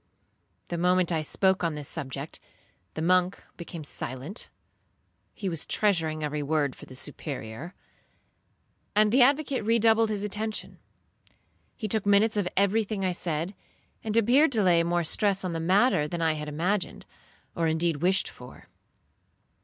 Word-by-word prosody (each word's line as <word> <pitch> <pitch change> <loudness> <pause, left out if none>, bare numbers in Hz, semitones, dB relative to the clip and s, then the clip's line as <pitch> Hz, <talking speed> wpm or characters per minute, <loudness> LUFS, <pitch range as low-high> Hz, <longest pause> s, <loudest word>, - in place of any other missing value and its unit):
The 170 - -3
moment 180 0 +3
I 160 -2 +1
spoke 190 +4 +1
on 165 -2 0
this 145 -2 -4
subject 140 -1 -6 0.6
the 155 - -3
monk 180 +2 +2
became 170 -2 -8
silent, 140 - -5 0.9
(he 200 - -4
was 165 -4 -2
treasuring 165 -7 +1
every 150 0 -2
word 145 -2 0
for - - -13
the 130 - -11
Superior), 140 +2 -6 1.2
and 210 0 +4
the 255 +3 +5
advocate 275 -1 +3
redoubled 225 0 +3
his 205 -2 -2
attention. 215 +1 -3 1.0
He 220 - -3
took 210 -1 0
minutes 205 +2 +4
of 205 -3 0
every 200 +3 +3
thing 200 -2 -3
I 185 - +1
said, 170 +1 -2 0.5
and 220 0 -1
appeared 260 +7 +4
to 215 -3 +3
lay 175 -2 +4
more 175 +1 0
stress 195 +3 +2
on 180 -2 -2
the 165 - -2
matter 185 -1 +3
than 170 +2 -4
I 165 -1 +2
had 150 -1 -5
imagined, 180 +6 -2 0.5
or 165 -1 0
indeed 160 0 +1
wished 180 +5 +2
for. - - -13
180 Hz, 155 wpm, -27 LUFS, 160-210 Hz, 1.2 s, the